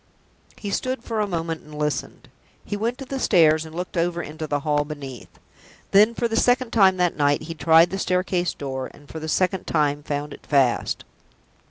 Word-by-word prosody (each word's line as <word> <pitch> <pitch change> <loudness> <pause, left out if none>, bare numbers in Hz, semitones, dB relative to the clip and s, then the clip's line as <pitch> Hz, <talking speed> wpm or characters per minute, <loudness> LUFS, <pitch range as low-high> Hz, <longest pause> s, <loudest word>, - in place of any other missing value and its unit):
He 205 -3 -5
stood 255 +4 -2
for 225 -3 -3
a 210 - +1
moment 165 -3 -3
and 150 0 -12
listened; 150 -3 -3 0.4
he - - -3
went 230 +4 -2
to 270 - -7
the 270 +1 -4
stairs 160 -8 +4
and 160 - -12
looked 180 +2 -5
over 175 0 0
into 155 +1 -6
the 145 -1 -1
hall 145 0 +1
beneath. 140 -5 -8 0.6
Then, 210 +4 +5
for 235 - 0
the 225 - -3
second 245 +1 +2
time 190 -4 +5
that 180 -3 +1
night, 145 0 +2
he 165 +1 -6
tried 165 +1 +5
the 195 - -3
staircase 180 -1 0
door, 130 -2 -4
and 145 0 -18
for 160 - -7
the 160 0 -5
second 185 +3 0
time 145 -2 +1
found 145 0 -4
it - - -13
fast. 135 -5 +1
165 Hz, 200 wpm, -23 LUFS, 150-195 Hz, 0.6 s, Then